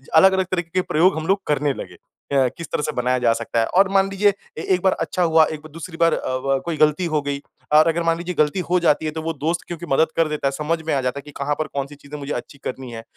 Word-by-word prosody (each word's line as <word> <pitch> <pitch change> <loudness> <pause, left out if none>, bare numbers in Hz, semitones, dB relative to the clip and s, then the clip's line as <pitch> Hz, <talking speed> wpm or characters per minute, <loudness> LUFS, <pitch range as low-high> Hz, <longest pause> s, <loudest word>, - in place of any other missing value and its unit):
अलग, 190 +4 +7
अलग 190 0 +1
तरीके 175 -3 -1
के - - +3
प्रयोग 180 +1 +2
हम 160 0 -4
लोग 195 +1 +2
करने 145 -1 +1
लगे। - - -8 0.4
अ, 135 -2 +4
किस 170 - -6
तरह - - 0
से - - -1
बनाया 125 +1 +1
जा 120 -2 +3
सकता 115 - -2
है 115 - +3
और 190 +1 +3
मान 195 0 +3
लीजिए 200 +1 +3 0.2
ए - - -3
एक 180 - -5
बार 190 0 +3
अच्छा 180 - 0
हुआ, 160 -1 +5
एक 155 -1 -5
ब - - -10
दूसरी 165 +2 -8
बार 165 0 +4
अ, - - -2
व 135 +1 0
कोई 170 -2 -2
गलती 155 +4 +3
हो 155 -3 0
गई। 140 0 -3 0.3
और 155 +2 +7
अगर 165 +1 +1
मान 165 0 +2
लीजिए 175 +1 -4
गलती 150 +5 +2
हो 180 0 +3
जाती 160 -2 +2
है 155 - -1
तो 160 +1 -5
वो 165 +1 -2
दोस्त 160 +3 -1
क्योंकि 175 0 -6
मदद 155 +4 +4
कर 165 -1 +3
देता 150 -2 -1
है - - +1
समझ 155 +4 -2
में - - +1
आ 135 - +1
जाता 130 +2 -2
है - - -8
कि 150 - -10
कहाँ 145 +1 -1
पर 155 - -1
कौन-सी 140 +1 -5
चीज़ें 145 +1 -10
मुझे 140 +1 -4
अच्छी - - -6
करनी 130 -1 -5
है। 115 -1 -7
155 Hz, 295 wpm, -22 LUFS, 140-170 Hz, 0.4 s, अलग